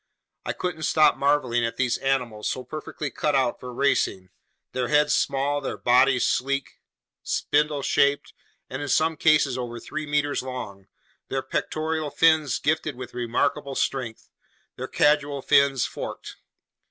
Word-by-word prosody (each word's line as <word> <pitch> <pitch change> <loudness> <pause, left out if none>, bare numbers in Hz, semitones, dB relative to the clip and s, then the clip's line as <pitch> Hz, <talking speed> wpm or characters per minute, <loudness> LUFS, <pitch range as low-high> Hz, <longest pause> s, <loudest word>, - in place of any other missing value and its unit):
I - - -1
couldn't 180 -3 -4
stop 155 0 +4
marveling 140 -4 +1
at 115 - -2
these 125 -2 0
animals 125 -6 -1
so 130 - -3
perfectly 150 +1 -6
cut 150 -2 0
out 130 -3 +1
for 125 - -8
racing, 110 -7 0 0.4
their 125 -1 -2
heads 150 +1 +3
small, 140 +1 0
their 135 - -4
bodies 125 +1 +4
sleek, 135 +1 -1 0.4
spindle 150 -1 0
shaped, 140 +1 +1 0.3
and 130 +2 -6
in 145 - -4
some 160 +3 +2
cases 145 -5 +3
over 120 -1 -5
three 155 +5 -6
meters 145 -1 0
long, 120 -7 -7 0.4
their 135 0 -2
pectoral 155 -1 -2
fins 155 -4 +3
gifted 155 -1 -1
with 125 -1 -9
remarkable 125 +4 -1
strength, 125 -5 -2 0.5
their - - -5
caudal 145 -2 +1
fins 140 -3 +3
forked. - - -7
140 Hz, 140 wpm, -25 LUFS, 125-150 Hz, 0.5 s, stop